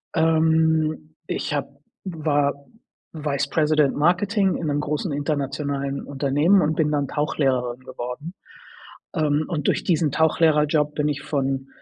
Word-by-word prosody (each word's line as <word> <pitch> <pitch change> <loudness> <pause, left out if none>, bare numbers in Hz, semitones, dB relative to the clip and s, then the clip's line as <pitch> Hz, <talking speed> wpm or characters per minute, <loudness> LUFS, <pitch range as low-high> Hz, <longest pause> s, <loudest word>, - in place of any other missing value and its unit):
ähm, 160 -1 +2
ich - - -3
habe 140 -1 -1 0.4
war 150 -5 0 0.6
Vice 145 -3 -2
President 150 -2 +2
Marketing 190 +5 +2
in 165 - -3
'nem 145 0 0
großen 150 +3 -2
internationalen 140 -1 -2
Unternehmen 145 +7 +2
und 155 -1 0
bin 150 -2 +2
dann 140 -2 0
Tauchlehrerin 130 -4 -1
geworden. 130 +6 -7 0.8
Ähm, 155 -2 +1
und 155 -5 -2
durch - - +1
diesen 160 -5 +1
Tauchlehrer-Job 150 -1 +2
bin 150 0 0
ich 145 -1 -3
von 135 -2 -2
150 Hz, 125 wpm, -23 LUFS, 140-160 Hz, 0.8 s, ähm